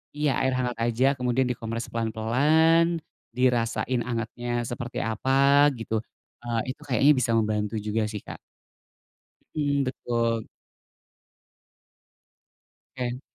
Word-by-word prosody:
Iya, 150 -1 +1
air 130 - +2
hangat 125 -2 -2
aja 120 +2 +1
kemudian 125 +1 +1
dikompres 115 -1 -4
pelan-pelan, 150 +10 +2 0.3
dirasain 120 -1 +1
hangatnya 120 +1 -4 0.2
seperti 120 0 -4
apa, 135 +6 +4
gitu, 115 -1 -3 0.5
eee, 115 -1 -1
itu 145 - -12
kayaknya 135 +3 +4
bisa 115 - 0
membantu 105 0 0
juga 110 +1 -1
sih, 105 -2 -6
Kak. - - -9 1.2
Mmm, 145 -2 +1
betul. 115 -3 -1 2.5
Oke. 125 0 -3
120 Hz, 105 wpm, -26 LUFS, 115-135 Hz, 2.5 s, apa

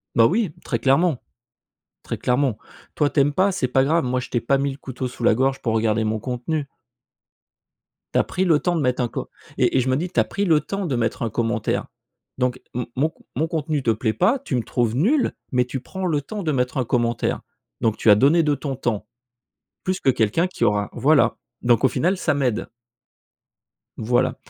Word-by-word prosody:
Bah 115 - +6
oui! 200 - +1
Très 115 -4 -1
clairement, 140 +1 +3 0.8
très - - -4
clairement. 125 -3 +1 0.4
Toi, 145 -2 +2
tu - - 0
aimes 145 +1 +2
pas, 190 +5 +3
c'est 135 -9 0
pas 130 +1 +3
grave, 160 +2 +2
moi, 125 0 0
je 125 - -7
t'ai 120 - 0
pas 135 +3 +2
mis 140 0 0
le 135 - -9
couteau 130 -2 -5
sous 125 - -9
la - - +5
gorge 135 +3 0
pour 115 -3 0
regarder 110 0 +1
mon 110 0 -1
contenu. 130 +5 -3 1.5
Tu - - +3
as - - +4
pris 185 - -2
le 160 -4 +4
temps 175 -1 0
de 160 - 0
mettre 125 -1 +1
un - - 0
co - - -6 0.3
et - - +2
et - - +4
je 130 - -1
me 130 - +3
dis, 175 +3 -2
tu - - 0
as - - +5
pris 200 0 -2
le 160 -4 +4
temps 195 -1 -4
de 135 -6 -1
mettre 115 0 -1
un 115 - -1
commentaire. 115 -1 -1 0.5
Donc 125 0 -1
m 125 0 -2
mon 150 +5 +2
con - - -25
mon 160 +5 0
contenu 155 -3 -2
te 115 - +3
plaît 110 0 0
pas, 245 - +2
tu 155 - -3
me 120 - 0
trouves 120 -2 0
nul, 245 - +2 0.2
mais 125 -1 +2
tu 130 +1 -4
prends 190 +4 -5
le 150 -3 +1
temps 205 +5 -6
de 155 - 0
mettre 125 0 -1
un 125 - +1
commentaire. 120 -1 0 0.4
Donc 110 -2 +1
tu 110 - +2
as 105 - +9
donné 150 +9 +4
de 150 -1 +2
ton 140 -2 -4
temps, 110 -4 -2 0.8
plus 185 0 -1
que 135 - +2
quelqu'un 125 - +2
qui 180 - -4
aura 105 -1 +1
voilà, 145 +1 +3 0.2
donc 120 +1 +3
au - - +7
final, 185 +3 0
ça 155 -4 +1
m'aide. 125 -5 -1 1.3
Voilà. 120 +2 +1
130 Hz, 225 wpm, -22 LUFS, 120-155 Hz, 1.5 s, as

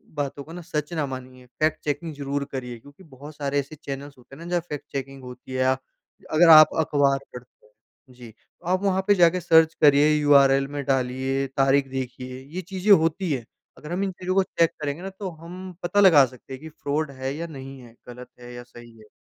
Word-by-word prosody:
बातों 140 -1 -4
को 160 - -14
ना, 180 - -8
सच 155 -1 -4
ना 155 -3 -1
मानिए, 130 -1 -9
फ़ैक्ट 155 +5 -2
चेकिंग 150 +2 -3
ज़रूर 140 0 -3
करिए। 125 -3 -6
क्योंकि 145 +9 -17
बहुत 145 0 -13
सारे 145 -1 -1
ऐसे 140 +3 -6
चैनल्स 140 -1 -8
होते 125 +2 -16
हैं 165 - -11
ना, 175 - -8
जहाँ 175 -1 0
फ़ैक्ट 150 -2 -6
चेकिंग 135 0 -6
होती 125 +1 -11
है, - - -2
या 130 0 +2 0.5
अगर 165 +2 +5
आप 155 -1 +10
अखबार 140 -3 +2 0.2
पढ़ते 125 -2 -13
हैं, 105 - -32 0.4
जी, 120 -2 -13
तो 140 +8 -28
आप 185 +1 +1
वहाँ 190 -1 +1
पे 205 - +5
जाके 175 0 +4
सर्च 160 -1 +4
करिए, 145 0 +6
यूआरएल 140 -2 +4
में 145 0 -5
डालिए, 135 0 -1
तारीख 135 0 +3
देखिए, 130 -1 -6 0.2
ये 185 - -2
चीज़ें 190 +3 -1
होती 165 -1 +3
हैं। 125 -5 -3 0.3
अगर 150 - -10
हम 185 +3 -1
इन 195 - -2
चीज़ों 185 0 -4
को 195 - +4
चेक 165 -3 +1
करेंगे 145 +3 -3
ना, 195 - -5
तो 190 0 -7
हम 180 +3 -10
पता 190 +4 +1
लगा 165 -9 +7
सकते 130 +1 -12
हैं 130 - -9
कि 160 - -9
फ्रॉड 150 0 -3
है 130 +1 -3
या 165 +2 -5
नहीं 135 -3 -10
है, 120 -2 -15
गलत 125 +1 -11
है 120 0 -11
या 120 0 -9
सही 120 -1 -15
है। 110 - -17
145 Hz, 220 wpm, -24 LUFS, 130-165 Hz, 0.5 s, आप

